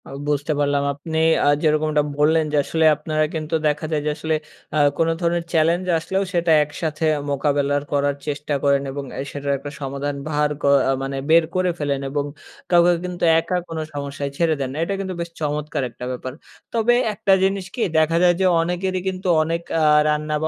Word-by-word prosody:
আ - - -11 0.2
বুঝতে 145 +1 0
পারলাম। 145 -1 +1
আপনি 160 +3 -5 0.3
আ - - +3 0.2
যেরকমটা 155 -1 +2 0.2
বললেন 155 +2 +3
যে, - - +3
আসলে 160 +2 0
আপনারা 155 +1 -1
কিন্তু 155 +1 -2
দেখা 150 +1 -1
যায় 150 -2 0
যে - - +1
আসলে 160 0 -1 0.4
আ - - +1 0.2
কোনো 165 0 +2
ধরনের 170 0 0
চ্যালেঞ্জ 165 +3 +2
আসলেও 190 +4 -1
সেটা 170 -1 +2
একসাথে 155 +1 -3 0.3
মোকাবেলা 140 0 +1 0.2
করার 145 0 +1
চেষ্টা 150 0 -3
করেন 140 -1 +3
এবং 140 +1 -5 0.2
এ - - -1
সেটার 140 0 -3
একটা 145 +1 -8
সমাধান 140 +1 -3
ভার 150 -1 +1
ক - - -14 0.3
আ - - +4
মানে 135 0 -3
বের 165 +1 +6
করে 185 -1 +2
ফেলেন 140 -2 -1
এবং 145 +1 -1 0.5
কাউকে 175 0 +5
কিন্তু 180 -1 -5 0.2
একা 165 +2 -2
কোন 165 -1 -6 0.2
সমস্যায় 140 0 -4
ছেড়ে 165 -2 +2
দেন 135 -2 -2
না, - - -7
এটা 200 - -2
কিন্তু 190 -1 -3
বেশ 170 - -4
চমৎকার 150 -1 -2
একটা 125 - -9
ব্যাপার। 130 0 -5 0.4
তবে 230 +1 +3 0.2
একটা 200 -1 +2
জিনিস 195 -1 0
কি 245 - -3 0.2
দেখা 160 +1 +3
যায় 175 -1 +6
যে, - - +3 0.2
অনেকেরই 180 +2 -2
কিন্তু 190 0 -3 0.2
অনেক 165 +1 -2 0.2
আ - - +3 0.2
রান্না 150 0 0
বা - - +2
155 Hz, 195 wpm, -21 LUFS, 145-170 Hz, 0.5 s, বের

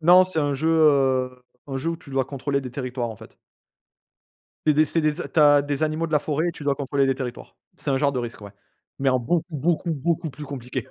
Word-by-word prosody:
Non, 180 +3 +7
c'est 185 -3 -1
un 145 -2 +1
jeu 155 +4 0
heu, 135 -5 +3 0.2
un 135 -2 -4
jeu 155 +5 -1
où 165 - -3
tu 150 - -15
dois 135 -1 +1
contrôler 140 +1 -2
des 130 - -7
territoires, 125 -1 -3
en 110 - -9
fait. - - -15 1.3
C'est 155 - +6
des 155 +1 +4
c'est 165 +2 +1
des 155 +3 0
a - - -5
tu 160 - 0
as 145 -1 +7
des 145 +1 -2
animaux 155 +2 0
de - - -11
la 150 - +5
forêt 155 +3 -1
et 175 - 0
tu 155 - -10
dois 140 -1 +2
contrôler 140 0 0
des 135 - +2
territoires. 125 -2 -7 0.2
C'est - - -3
un 135 - +2
genre 140 0 +2
de 135 - -3
Risk, 120 -2 -5
ouais, 100 - -9 0.5
mais 135 0 +2
en 130 -1 +2
beaucoup, 160 +6 -1
beaucoup, 170 +4 0
beaucoup 160 +2 -1
plus 140 +3 -9
compliqué. 130 -3 -5
140 Hz, 255 wpm, -24 LUFS, 130-155 Hz, 1.3 s, Non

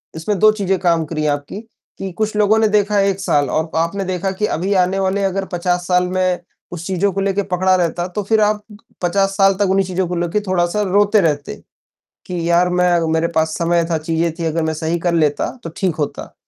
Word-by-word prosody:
इसमें 180 +6 -2
2 215 0 +6
चीज़ें 195 -3 -1
काम 170 -3 +1
करी 155 0 -3
आपकी 145 +6 -3 0.4
कि 195 -1 -5
कुछ 215 -1 -1
लोगों 210 +1 +3
ने 220 - +4
देखा 210 -1 +2
1 195 -1 0
साल 145 -7 +1
और 160 +4 -1
आपने 170 +5 0
देखा 185 +1 -2
कि 195 +2 -2
अभी 190 +5 -1
आने 185 +2 0
वाले 195 +1 0
अगर 195 0 -1
50 175 0 -1
साल 180 0 +2
में 185 -1 0 0.3
उस 170 -1 -7
चीज़ों 195 +1 0
को 195 - -2
लेके 200 +1 0
पकड़ा 185 +1 +3
रहता 175 0 -1
तो 205 +3 -4
फ़िर 220 +2 +2
आप 210 0 +1 0.4
50 195 +2 +1
साल 195 -1 +5
तक 205 - +2
उन्हीं 195 0 +2
चीज़ों 185 0 -1
को 180 - -3
लेके 175 +4 0
थोड़ा-सा 180 +2 +1
रोते 205 +2 +3
रहते 150 -4 -1 0.7
कि 175 -2 -3
यार 175 +1 +4
मै 180 0 +2 0.2
मेरे 160 +1 +1
पास 160 0 +1
समय 170 0 +2
था, 165 - +1
चीज़ें 165 +1 -1
थी 170 - -3
अगर 165 0 -1
मैं 160 0 -1
सही 160 +2 -2
कर 175 0 0
लेता 150 -3 +1
तो 165 - -5
ठीक 185 -4 0
होता। 150 -3 -4
180 Hz, 220 wpm, -18 LUFS, 170-195 Hz, 0.7 s, 2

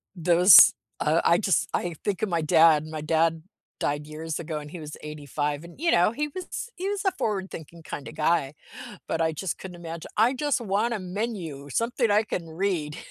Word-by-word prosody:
those, 175 0 +8 0.3
uh 155 +2 +2
I 170 - +4
just 190 -5 +1
I 175 -1 -2
think 200 -1 -2
of 215 - 0
my 170 -2 0
dad, 160 -1 +5
my 155 -1 -6
dad 160 +1 +1 0.4
died 145 +1 -2
years 155 +1 -5
ago 160 -1 -4
and 150 0 -8
he 175 - -8
was 155 -1 -8
85, 150 0 -4
and, 170 +7 -13
you 335 +1 +2
know, 175 - +4
he 295 +4 -2
was 370 +8 -6
he 380 +2 -3
was 405 -1 -3
a 385 - +3
forward-thinking 190 - -5
kinda 145 - -7
guy, 155 -3 0 0.5
but 165 - -1
I 160 0 +2
just 160 +3 -4
couldn't 185 -2 -9
imagine 165 -1 -8
"I 230 +4 +4
just 285 -1 -1
want 220 +2 0
a - - -4
menu, 180 -7 -5
something 230 - 0
I 210 +2 +4
can 180 -5 -4
read." 160 -3 -2
170 Hz, 195 wpm, -26 LUFS, 155-210 Hz, 0.5 s, those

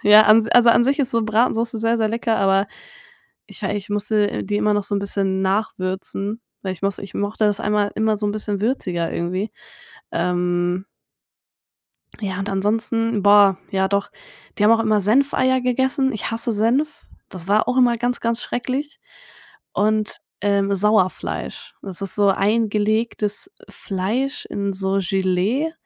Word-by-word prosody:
Ja, 210 +1 +8
an 220 +1 +5
also, 240 -1 +6
an 235 +1 +4
sich 275 +3 +1
ist 270 - +1
so 230 -1 +1
Bratensoße 230 +1 +1
sehr, 230 +1 +1
sehr 220 -1 +1
lecker, 230 0 -1
aber 195 0 +2 0.8
ich - - -11
wei - - -1
ich 205 +1 -6
musste 210 0 0
die 205 +2 -2
immer 210 0 +2
noch 205 -1 0
so 205 - -2
'n - - +1
bisschen 195 -1 0
nachwürzen, 195 +1 -2 0.2
weil 190 -1 -3
ich 185 - -12
muss 195 -1 -1
ich 195 - -9
mochte 205 +2 -1
das 205 -1 0
einmal 210 -1 0
immer 220 0 +1
so 210 - 0
'n 205 - -1
bisschen 205 -2 -3
würziger 185 -8 -1
irgendwie. 185 +5 -2 0.6
Ähm. 180 +1 -1 1.3
Ja, 190 -3 -4
und 200 0 -3
ansonsten 220 +2 0
boah, 205 -2 +6
ja 190 -2 +1
doch, 200 0 -1 0.5
die 205 - +2
haben 220 - +6
auch 225 - +3
immer 215 -2 +2
Senfeier 260 +4 +2
gegessen. 265 +2 0
Ich 215 - -4
hasse 230 +1 -1
Senf. 250 +8 0 0.2
Das 180 -2 -10
war 210 +4 +2
auch 250 - 0
immer 240 -2 +4
ganz, 245 +1 -1
ganz 230 0 -1
schrecklich. 265 +5 -4 0.7
Und, 215 0 0 0.2
ähm, 200 0 +1
Sauerfleisch. 205 -1 -1
Das 195 -1 -7
ist 195 - -1
so 205 -1 +3
eingelegtes 215 - 0 0.2
Fleisch 215 +8 -3
in 200 -1 -3
so 190 +1 -1
Gelee. 195 - 0
210 Hz, 160 wpm, -21 LUFS, 195-230 Hz, 1.3 s, Ja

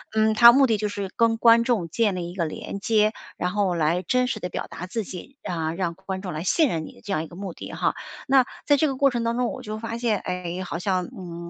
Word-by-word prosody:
嗯， 220 0 +3
它 235 +2 +10
目 270 +2 +5
的 220 -3 +2
就 210 0 -1
是 200 -2 -4
跟 230 -1 +3
观 230 0 +6
众 225 -9 0
建 210 +1 +1
立 175 -1 -4
一 - - -12
个 170 -3 0
连 160 +5 -6
接， 215 +1 +3 0.3
然 180 - -1
后 200 -2 +1
来 170 +2 +1
真 250 +6 +1
实 220 - -3
地 180 - -4
表 - - -4
达 180 - -7
自 215 +4 -3
己， 195 +10 -10
啊， 160 -2 -2
让 170 -1 -2
观 190 0 -6
众 185 -3 -5
来 155 +2 -4
信 310 - +3
任 160 -5 -2
你 - - -11
的 - - -19
这 205 - -7
样 155 -2 0
一 160 - -8
个 170 - -13
目 190 -2 -6
的 - - -9
哈。 - - 0 0.3
那 265 -1 +5 0.2
在 290 -1 +5
这 310 - +3
个 270 - -2
过 275 +1 +4
程 240 -2 -2
当 230 0 0
中， 250 0 +1
我 260 -2 -8
就 215 +1 -5
发 230 +1 -4
现， 230 -4 0
哎， 180 0 -4
好 170 -2 -4
像， 185 -1 0
嗯， 170 -6 -8
200 Hz, 300 characters per minute, -24 LUFS, 180-230 Hz, 0.3 s, 它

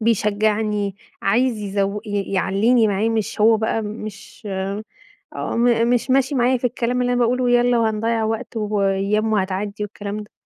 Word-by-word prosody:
بيشجعني 210 -2 0 0.3
عايز 235 +3 +2
يزو 200 0 -1
ي 200 -1 -3
يعليني 215 +4 +3
معاه 205 +3 +1
مش 220 -2 -2
هو 225 +1 +6
بقى 220 +1 -1
مش 215 +1 -8 0.9
م 235 -1 +1
مش 245 +1 +1
ماشي 270 +2 +2
معايا 255 +1 +3
في 250 +1 0
الكلام 245 +1 -1
اللي 245 0 +1
أنا 245 - +1
باقول 240 +2 +2
له 250 -1 +1
يالّا 245 0 +3
وهنضيّع 225 0 0
وقت 225 +2 -3
وأيّام 210 +1 0
وهتعدي 200 +1 -2
والكلام 205 0 -6
ده. 210 - -19
220 Hz, 155 wpm, -21 LUFS, 205-235 Hz, 0.9 s, هو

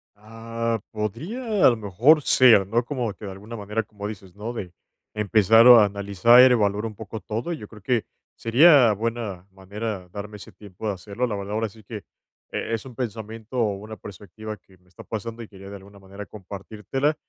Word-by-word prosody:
Ah, 115 +2 -4
podría 195 - -2
a - - +9
lo 120 - 0
mejor 110 - +3
ser, 115 -6 +6
¿no?, 115 +4 +1
como 120 -5 -3
que 105 - -11
de 95 - -6
alguna 105 +5 -9
manera, 105 +1 -3
como 105 -1 -8
dices, 95 -4 -10
¿no?, 110 +4 -6
de 90 -7 -7 0.4
empezar 110 +2 +4
o 120 -2 +10
analizar, 100 +3 +4
e - - +9
evaluar 105 -2 +1
un 110 -2 -6
poco 110 +1 -8
todo. 110 - -4
Yo 105 -10 -8
creo 105 -2 -15
que 120 +1 0 0.3
sería 125 -1 +5
buena 110 -4 -4
manera 100 0 -6
darme 105 +2 -8
ese - - -13
tiempo 105 +1 -9
de 105 - 0
hacerlo. 100 +7 -4
La 110 - -3
verdad, 100 +1 -5
ahora 110 +1 -1
sí 110 +2 -18
que 105 0 -8 0.5
e 115 - -4
es 115 - -3
un 125 -3 -11
pensamiento 110 0 -6
o 105 -4 +1
una 110 +2 -9
perspectiva 105 +2 -9
que 95 -2 -24
me 90 0 -32
está 90 - -14
pasando, 115 +1 -6
y - - -11
quería 95 -1 -12
de 100 - -8
alguna 100 +1 -14
manera 100 +1 -10
compartírtela, 105 +9 -4
110 Hz, 200 wpm, -24 LUFS, 100-115 Hz, 0.5 s, o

